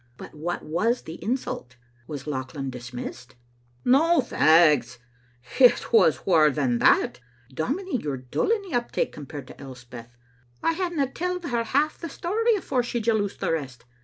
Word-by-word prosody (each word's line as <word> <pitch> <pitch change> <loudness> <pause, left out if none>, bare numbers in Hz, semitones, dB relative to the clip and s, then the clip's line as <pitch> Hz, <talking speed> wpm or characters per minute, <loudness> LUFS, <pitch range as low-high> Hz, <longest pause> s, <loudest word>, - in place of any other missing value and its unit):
* - - -36
" - - -37
" - - -36
But - - -10
what 165 +3 -4
was 215 +10 0
the 165 +1 -9
insult? 215 - -3 0.3
Was 145 -3 -6
Lauchlan 135 -1 -4
dismissed?" 125 0 -8 0.3
" 120 0 -36
Na, 320 +7 +4
f 260 - 0
aags! 150 -7 +4 0.6
It 250 -2 +5
was 145 - +4
waur 160 -5 +5
than 130 -5 0
that. - - +3 0.3
Dominie, 285 - -2
you 150 - -4
're 135 - -3
dull 125 - -2
in 445 -2 +1
the 375 - -9
uptake 240 -1 -1
compared 145 -1 -8
to 130 - -13
Elspeth. 125 -2 -11 0.5
I 330 - +2
hadna 345 -5 -1
telled 360 +1 -3
her 240 -7 -1
half 290 +6 0
the 335 - -6
story 440 +10 0
afore 280 -10 -1
she 240 0 -3
jaloused 215 -3 -1
the 185 -4 0
rest. 135 -7 -4
165 Hz, 180 wpm, -25 LUFS, -, 0.6 s, It